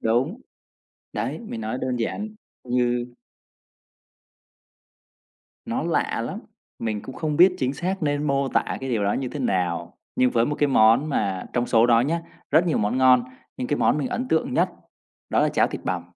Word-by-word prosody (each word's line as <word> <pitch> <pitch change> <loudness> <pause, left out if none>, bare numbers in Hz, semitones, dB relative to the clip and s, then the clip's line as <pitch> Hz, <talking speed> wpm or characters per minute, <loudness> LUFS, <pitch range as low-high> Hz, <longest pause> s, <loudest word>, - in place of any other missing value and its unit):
Đúng. 130 - 0 0.7
Đấy, - - -3
mình 215 - -7
nói 110 +4 -3
đơn 130 -1 -1
giản 160 - -2 0.4
như 120 -1 0 2.6
Nó - - -2
lạ - - 0
lắm! - - -5 0.4
Mình 110 -2 -3
cũng 130 - -9
không 155 -3 -2
biết 180 +1 +6
chính 130 +1 0
xác 185 +4 -3
nên 145 0 0
mô 140 -1 +1
tả - - +2 0.2
cái 135 -1 -4
điều 105 -4 0
đó 100 - +2
như 130 -2 -2
thế 145 - -6
nào, 85 -6 -1 0.2
nhưng 125 0 +3
với 115 -1 +2
một 150 - -1
cái 145 - +3
món 125 +3 +4
mà 95 -9 -1
trong 120 0 0
số 115 0 +4
đó 115 -1 +5
nhá, 165 +7 0 0.3
rất 160 +5 +4
nhiều 165 - +1
món 105 +4 0
ngon 125 -2 +5 0.3
nhưng 125 - -3
cái 145 - +1
món 150 - +2
mình 140 - -1
ấn 250 +1 -3
tượng 250 +11 +1
nhất - - +2 0.6
đó - - +3
là - - +3
cháo - - +2
thịt - - -6
bằm. - - -1
130 Hz, 190 wpm, -24 LUFS, 115-150 Hz, 2.6 s, biết